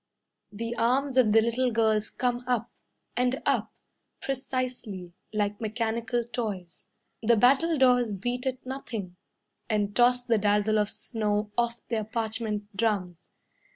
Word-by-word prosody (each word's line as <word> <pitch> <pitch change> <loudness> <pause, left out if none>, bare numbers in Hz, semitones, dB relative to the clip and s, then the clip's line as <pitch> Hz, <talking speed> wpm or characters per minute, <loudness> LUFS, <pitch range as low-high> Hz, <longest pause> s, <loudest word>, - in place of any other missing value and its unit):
The 230 +3 -4
arms 255 +4 +2
of 250 -5 +5
the 225 +1 +6
little 240 +2 +1
girls 220 -1 +2
Come 245 -1 -1
up 240 -2 0 0.4
and 250 +2 +1
up - - +1 0.5
Precisely, 255 -9 -3 0.2
Like 210 0 -1
mechanical 230 +1 -1
toys. 210 -7 -5 0.3
The 235 +1 +4
battledores 255 -1 +4
beat 245 +6 -3
at 255 -1 -3
nothing, 225 -8 -5 0.5
And 205 -2 0
toss 245 0 +4
the 230 -3 +2
dazzle 210 +1 +2
of 210 0 +1
snow 210 -2 -2
Off 235 0 -1
their 225 -2 -1
parchment 220 -2 -3
drums. 185 -5 -1
230 Hz, 125 wpm, -28 LUFS, 210-245 Hz, 0.5 s, the